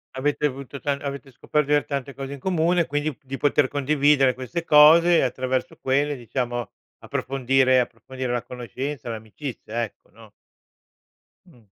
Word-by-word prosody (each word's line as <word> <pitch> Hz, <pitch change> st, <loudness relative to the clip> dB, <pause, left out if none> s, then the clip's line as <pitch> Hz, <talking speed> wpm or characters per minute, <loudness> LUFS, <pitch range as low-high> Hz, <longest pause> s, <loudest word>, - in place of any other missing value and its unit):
Avete 145 Hz, +2 st, 0 dB
avuto 140 Hz, 0 st, -4 dB
ta 145 Hz, -, -1 dB
avete 140 Hz, -1 st, -5 dB
scoperto 150 Hz, +3 st, -1 dB
di 150 Hz, -, +3 dB
aver 145 Hz, -, +2 dB
tante 140 Hz, -1 st, -4 dB
cose 135 Hz, +2 st, -6 dB
in 140 Hz, -, -8 dB
comune, 175 Hz, +1 st, +1 dB
quindi 145 Hz, -1 st, -2 dB
di 135 Hz, 0 st, -6 dB
poter 145 Hz, -1 st, +2 dB
condividere 145 Hz, -2 st, +3 dB
queste 130 Hz, +7 st, -4 dB
cose 165 Hz, +2 st, +7 dB
attraverso 130 Hz, +1 st, -2 dB
quelle 140 Hz, +2 st, 0 dB
diciamo, 120 Hz, -1 st, -3 dB, 0.3 s
approfondire 130 Hz, 0 st, +1 dB
approfondire 125 Hz, +1 st, -4 dB
la 120 Hz, -1 st, -1 dB
conoscenza, 125 Hz, +2 st, -6 dB
l'amicizia 115 Hz, +1 st, -6 dB
ecco, 105 Hz, -, -10 dB
no? 110 Hz, -2 st, -16 dB, 1.2 s
Mh. 125 Hz, -, -21 dB
135 Hz, 140 wpm, -24 LUFS, 125-145 Hz, 1.2 s, cose